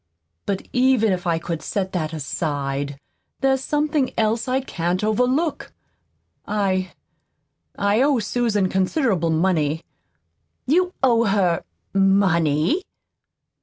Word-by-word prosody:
But 195 -1 -2
even 250 -4 +3
if 180 0 -2
I 165 -1 +2
could 165 -1 -4
set 190 -2 -2
that 160 -4 -2
aside, 140 -2 -3 0.4
there's 265 -1 +2
something 295 -1 0
else 225 +2 +1
I 255 +1 +1
can't 180 -7 -2
overlook. 250 +9 0 0.7
I 190 -3 0 0.8
I 200 +3 +2
owe 280 0 +3
Susan 220 -3 0
considerable 190 - +1
money." 160 -2 +1 0.8
"You 360 +6 +2
owe 235 -3 +4
her 195 -5 +1 0.3
MONEY?" 195 - +3
200 Hz, 105 wpm, -22 LUFS, 170-250 Hz, 0.8 s, owe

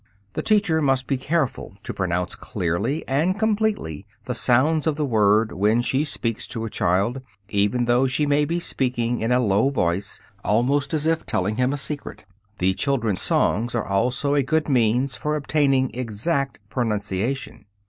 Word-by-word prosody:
The - - -2
teacher 200 -7 +2
must 135 -3 +1
be 135 - 0
careful 135 -6 -2
to - - -5
pronounce 90 -1 -1
clearly 100 - -2
and 160 +8 +1
completely 210 - -1 0.2
the 125 - -2
sounds 130 +7 +2
of 155 - +1
the 150 0 -1
word 110 -2 +3
when 105 +5 +2
she 135 +4 +1
speaks 115 -6 -3
to 115 -2 -4
a 110 - -6
child, 100 +9 0 0.3
even 105 +4 +1
though 120 +2 +3
she 130 +4 +1
may 145 +1 +2
be 170 +3 -1
speaking 125 -6 -1
in 115 +2 0
a 125 - +4
low 105 +2 +2
voice, 95 -6 -1 0.2
almost 140 +7 +1
as 155 0 -1
if 160 0 +1
telling 110 -2 -1
him 125 +1 +2
a 145 - -2
secret. 145 +1 -5 0.3
The 95 +1 +2
children's 115 -5 0
songs 115 +5 +1
are 115 - -1
also 125 +8 0
a 145 - +3
good 155 +4 0
means 125 0 +2
for 150 0 -1
obtaining 140 -3 +1
exact 130 +5 -2
pronunciation. 115 +1 -2
125 Hz, 170 wpm, -23 LUFS, 110-145 Hz, 0.3 s, a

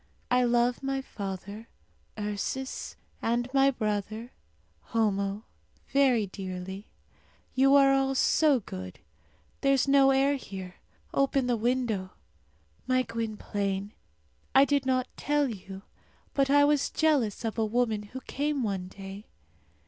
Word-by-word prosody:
I 250 0 +4
love 240 0 +2
my 270 0 -1
father, 200 -2 -7 0.5
Ursus, 210 +6 -4 0.3
and 240 +1 0
my 270 0 +5
brother, 215 -1 -3 0.5
Homo, 205 -2 0 0.5
very 260 -6 +4
dearly. 190 0 -7 0.7
You 270 +1 +5
are 275 -1 +6
all 270 0 +1
so 285 -1 +3
good. 95 - -8 0.6
There 275 0 +4
is 270 0 +2
no 275 -1 +6
air 275 +1 +3
here. 190 -7 -8 0.4
Open 275 -1 +2
the 245 -1 +1
window. 230 -5 -1 0.7
My 255 0 +3
Gwynplaine, 205 -3 -3 0.6
I 270 +1 +8
did 280 -2 +1
not 255 -1 +1
tell 295 -1 +1
you, 195 -4 -8 0.5
but 275 -1 +2
I 285 +1 +6
was 290 -1 +2
jealous 270 -9 +1
of 225 0 -2
a - - +3
woman 220 -1 0
who 230 +6 -9
came 285 0 -2
one 195 -4 -2
day. 195 +2 -10
240 Hz, 125 wpm, -28 LUFS, 205-270 Hz, 0.7 s, I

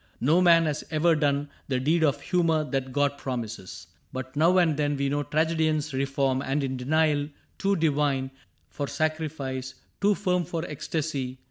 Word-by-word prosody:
No 155 +8 +3
man 170 -2 +6
has 150 -1 -2
ever 165 +2 +3
done 145 -2 +1 0.2
The 130 -2 0
deed 160 +5 +2
of 145 -4 +2
humor 165 -3 +1
that 135 -1 -1
God 140 +1 0
promises. 110 -7 -5 0.3
But 130 +1 -6
now 165 +5 +4
and 170 -4 +4
then 145 -1 0
we 140 0 0
know 145 +1 0
tragedians 155 0 0
Reform, 135 0 0
and 140 +1 -1
in 130 -1 -2
denial 145 +2 +1 0.3
too 200 0 +2
divine 145 -5 +1 0.4
For 145 - -3
sacrifice, 145 -5 -3 0.3
too 205 0 +4
firm 180 -3 0
for 165 +1 -4
ecstasy. 145 -4 -3
145 Hz, 160 wpm, -26 LUFS, 135-160 Hz, 0.4 s, man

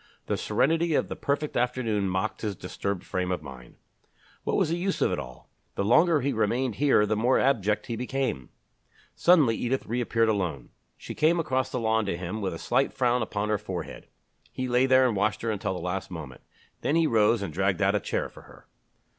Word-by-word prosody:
The - - -1
serenity 165 +2 +1
of - - 0
the - - -4
perfect 145 +1 -2
afternoon 120 -5 0
mocked 95 0 -2
his 105 -3 -2
disturbed 100 0 -4
frame 90 -1 -2
of 90 - -2
mind. 65 -2 -11 0.7
What - - 0
was - - +2
the 165 - 0
use 185 +2 -2
of - - +2
it - - -1
all? 65 -4 -10 0.2
The - - -1
longer 160 - +4
he 140 +2 0
remained 115 +2 0
here 135 -6 +4
the 110 - 0
more 120 +5 +3
abject 105 -6 +1
he 115 - -4
became!... 125 - -3 0.6
Suddenly 155 -10 +4
Edith 130 +3 -2
reappeared 115 -1 0
alone. 90 - -2 0.3
She - - -8
came 165 +3 +2
across 130 -4 0
the 125 - -2
lawn 110 -2 +1
to 85 - -1
him 90 +5 -5
with 95 -4 -2
a - - -6
slight 130 +10 +1
frown 125 -1 +1
upon 105 -1 -2
her 105 -1 +1
forehead. 95 -5 -6 0.4
He 130 - -3
lay 125 +1 +3
there 130 0 +5
and 115 - -1
watched 105 +3 0
her 115 - 0
until 100 -2 -2
the - - -4
last 90 +2 -3
moment. 75 -8 -8 0.4
Then 150 - 0
he 165 -1 +4
rose 110 -4 +3
and 95 - -5
dragged 95 +1 0
out 100 +1 +3
a 105 - +2
chair - - -2
for - - -15
her. - - -17
110 Hz, 210 wpm, -27 LUFS, 95-130 Hz, 0.7 s, there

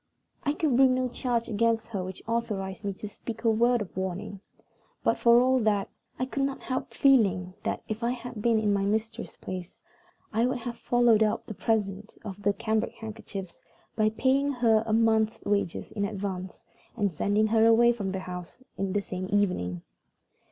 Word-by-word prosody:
I 290 -2 +1
could 300 -4 +1
bring 260 0 +5
no 255 0 0
charge 240 -1 -1
against 230 +1 +1
her 200 -5 -3
which 185 0 -8
authorized 210 -5 -2
me 200 - -1
to 205 +2 -7
speak 225 +3 -8
a 230 - +4
word 235 +1 +3
of 175 -6 -15
warning; 190 +1 -4 0.6
but, - - +2
for 235 0 +6
all 260 +1 +4
that, 210 -3 +1 0.3
I 255 - 0
could 275 +1 -3
not 275 0 -1
help 255 0 -3
feeling 200 -10 +3
that - - -3
if 215 +1 -4
I 235 - +2
had 245 -3 -5
been 230 0 +3
in 210 -2 +2
my 200 - +1
mistress's 220 +3 -2
place, 185 -1 -7 0.6
I 230 +3 +3
would 260 +1 -1
have 235 0 -5
followed 240 -2 +3
up 215 -1 +1
the 220 - -6
present 210 -1 -2
of 200 -1 -7
the 205 - +3
cambric 220 +2 -1
handkerchiefs 210 -4 -8 0.4
by 215 -1 +3
paying 265 +5 +2
her 230 -4 +3
a - - -1
month's 220 -1 +2
wages 200 -4 -1
in 205 - -2
advance, 190 -3 -5 0.3
and 205 -3 +1
sending 205 +7 +1
her 225 +1 +4
away 235 +1 +6
from 200 -5 -3
the 190 0 -3
house 180 +6 -8 0.2
the 195 +1 0
same 185 -1 -5
evening. 180 - 0
220 Hz, 185 wpm, -28 LUFS, 200-235 Hz, 0.6 s, for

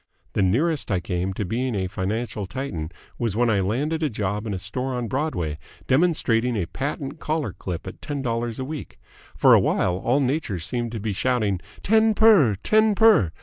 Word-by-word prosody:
The - - +1
nearest 140 - +1
I 95 -3 +1
came 90 +1 -2
to 100 - -3
being 120 +5 -2
a 95 -2 -1
financial 100 +2 -3
Titan 95 - -4 0.3
was 115 -4 -1
when 120 0 +2
I 100 - +2
landed 140 - -1
a 155 - +1
job 105 -1 -3
in 105 - -2
a - - -2
store 125 +8 -3
on 120 -1 -2
Broadway, 95 - -2 0.3
demonstrating 130 -6 +2
a 100 -5 0
patent 140 - -4
collar 155 -1 -2
clip 90 -3 -6
at - - -9
ten 145 -2 -4
dollars 115 -1 -2
a 130 - -3
week. 140 - -7 0.4
For - - +6
awhile 90 -1 +3
all 120 +8 +1
Nature 135 - -1
seemed 120 +7 -3
to 115 - -3
be 105 0 -2
shouting 105 -3 0 0.2
'Ten 220 +1 +4
per! 200 - +6
Ten 215 - +3
per!' 210 - +5
120 Hz, 190 wpm, -24 LUFS, 95-145 Hz, 0.4 s, For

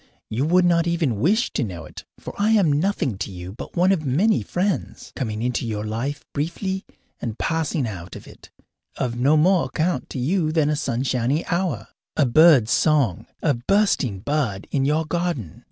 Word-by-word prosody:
You 120 +6 0
would 180 +2 +4
not 170 -1 +3
even 160 - 0
wish 205 - +2
to 140 - 0
know 90 -7 -6
it, - - -11
for - - -8
I 205 +2 +1
am 185 -9 +4
nothing 150 - 0
to 100 - -4
you 90 0 -8
but - - -9
one 180 +2 +4
of 180 -5 +1
many 180 - +2
friends, 180 -5 -3
coming 110 -3 -3
into 125 -1 -1
your 105 -2 -3
life 130 +7 -3
briefly 190 +6 -3 0.4
and 115 -2 -4
passing 160 -3 -1
out 90 -4 -7
of - - -10
it, - - -15 0.5
of 120 -3 -2
no 135 +6 +3
more 180 +3 +4
account 165 -4 -1
to - - -6
you 155 +5 0
than 155 -2 +2
a - - +1
sunshiny 130 +1 -1
hour, 170 - -2 0.3
a 145 - +4
bird's 130 -3 +6
song, 140 - +2 0.2
a 150 - +3
bursting 125 - +1
bud 120 -7 -1
in 135 -2 +1
your 155 +3 +1
garden. 170 - -3
145 Hz, 185 wpm, -23 LUFS, 120-170 Hz, 0.5 s, bird's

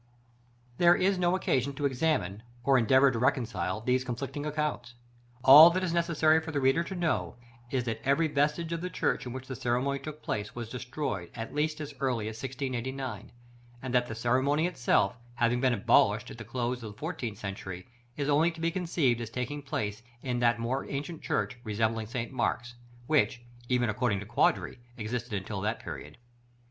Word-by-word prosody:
§ - - -34
VI. - - -34 0.7
There 175 0 +7
is 190 +1 +2
no 175 0 +3
occasion 140 -6 0
to 145 +1 -3
examine, 130 - 0 0.2
or 135 0 +4
endeavor 130 +4 +5
to 115 - -2
reconcile, 110 -6 0
these 125 +2 +1
conflicting 135 +4 -4
accounts. 150 -5 -3 0.5
All 145 +5 +11
that 185 +2 -1
is 175 -2 -1
necessary 160 -2 +3
for 160 0 -6
the 145 - 0
reader 135 +5 +3
to 190 - -6
know 175 -2 -1 0.3
is, 130 -1 0
that 115 -2 -3
every 140 +4 +3
vestige 150 +3 0
of 165 - -3
the 180 - -3
church 150 - -1
in - - -5
which 130 +1 -7
the 130 - -5
ceremony 125 +4 0
took 150 +2 -8
place 105 0 -3
was 120 -2 -5
destroyed 125 - -4
at 115 -1 -6
least 150 +1 0
as 150 -1 -6
early 125 -6 0
as 110 0 -6
1689; 130 0 -4 0.5
and 130 -1 -4
that 125 -1 +3
the 115 - -5
ceremony 130 +7 +2
itself, 125 -7 +1 0.2
having 120 0 +1
been 130 -1 +3
abolished 105 0 +3
in - - -9
the 110 - -7
close 120 +2 -2
of 110 -2 -7
the - - -23
fourteenth 140 - -4
century, 95 -3 -6 0.3
is 140 -1 -1
only 150 +3 +4
to 165 -1 -9
be 165 +1 0
conceived 160 -9 +1
as 115 - -5
taking 125 +5 -4
place 105 -6 -3 0.2
in 125 -2 -1
that 120 -1 +3
more 120 +4 -2
ancient 150 +4 -4
church, 125 -1 -2
resembling 110 0 -1
St. 115 +1 -4
Mark's, 120 -1 -1 0.3
which, 130 -4 +2 0.3
even 125 -1 +2
according 110 -2 0
to 105 - -7
Quadri, - - +1 0.2
existed 115 +1 -4
until 95 0 -3
that 110 +3 -1
period. - - -8
130 Hz, 190 wpm, -29 LUFS, 115-150 Hz, 0.7 s, All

